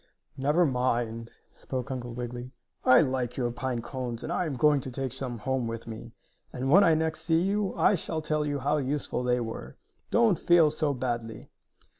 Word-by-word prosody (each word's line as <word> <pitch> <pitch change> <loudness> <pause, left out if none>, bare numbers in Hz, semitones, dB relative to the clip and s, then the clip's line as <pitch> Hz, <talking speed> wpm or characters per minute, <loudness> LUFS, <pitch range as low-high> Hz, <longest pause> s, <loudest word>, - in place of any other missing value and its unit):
"Never 150 +6 +2
mind," 120 -4 -1 0.2
spoke 130 +1 -5
Uncle 120 -2 -5
Wiggily, 125 +1 -6 0.3
"I 130 - +7
like 130 -4 -1
your 120 -2 0
pine 120 -1 -3
cones, 125 -3 -5
and 170 - -3
I 175 - 0
am 145 - -3
going 145 +3 +4
to 130 - -6
take 130 0 -4
some 130 -3 -4
home 130 +1 -1
with 115 0 -5
me, 115 +1 -8 0.4
and, 130 +2 -2
when 195 +5 +8
I 165 -3 +5
next 160 0 -1
see 165 0 +2
you, 200 +1 0
I - - +4
shall 165 -3 -2
tell 155 0 0
you 145 -1 -1
how 145 +3 +1
useful 140 -2 -2
they 125 0 +1
were. 115 - -6 0.3
Don't 230 -6 +3
feel 170 -3 +5
so 150 -2 0
badly." 120 -3 -4
130 Hz, 190 wpm, -28 LUFS, 120-155 Hz, 0.4 s, when